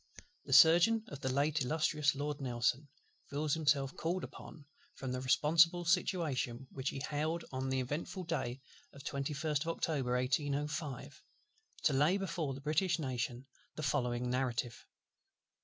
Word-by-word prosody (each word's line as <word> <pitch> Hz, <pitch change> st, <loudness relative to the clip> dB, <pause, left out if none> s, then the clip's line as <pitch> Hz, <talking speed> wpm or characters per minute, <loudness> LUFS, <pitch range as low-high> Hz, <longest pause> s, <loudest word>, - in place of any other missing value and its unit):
The 135 Hz, -, -2 dB
Surgeon 170 Hz, -, +7 dB
of 145 Hz, -, -8 dB
the 130 Hz, -1 st, -2 dB
late 145 Hz, +3 st, +1 dB
illustrious 150 Hz, +1 st, +1 dB
Lord 145 Hz, 0 st, -3 dB
NELSON 125 Hz, +3 st, 0 dB, 0.4 s
feels 145 Hz, +1 st, -1 dB
himself 150 Hz, -2 st, +1 dB
called 175 Hz, +1 st, -2 dB
upon, 150 Hz, -, -10 dB, 0.3 s
from 130 Hz, -2 st, -5 dB
the 130 Hz, 0 st, -3 dB
responsible 165 Hz, +6 st, +4 dB
situation 155 Hz, -8 st, 0 dB
which 135 Hz, 0 st, -3 dB
he 135 Hz, -, -5 dB
held 155 Hz, +4 st, -2 dB
on 130 Hz, 0 st, -3 dB
the 130 Hz, 0 st, 0 dB
eventful 150 Hz, +8 st, -4 dB
day 135 Hz, -7 st, -3 dB, 0.3 s
of 140 Hz, -, -12 dB
the -, -, -3 dB
21st 145 Hz, +1 st, -1 dB
of 160 Hz, -, -3 dB
October 140 Hz, -6 st, -1 dB
1805, 145 Hz, +2 st, -2 dB, 0.6 s
to 150 Hz, -, +3 dB
lay 150 Hz, +8 st, +3 dB
before 170 Hz, -8 st, -3 dB
the 135 Hz, -, -9 dB
British 160 Hz, +4 st, +1 dB
Nation 125 Hz, -3 st, -3 dB, 0.3 s
the 155 Hz, -, -5 dB
following 125 Hz, -3 st, 0 dB
Narrative. 125 Hz, -2 st, -2 dB
145 Hz, 145 wpm, -34 LUFS, 130-160 Hz, 0.6 s, Surgeon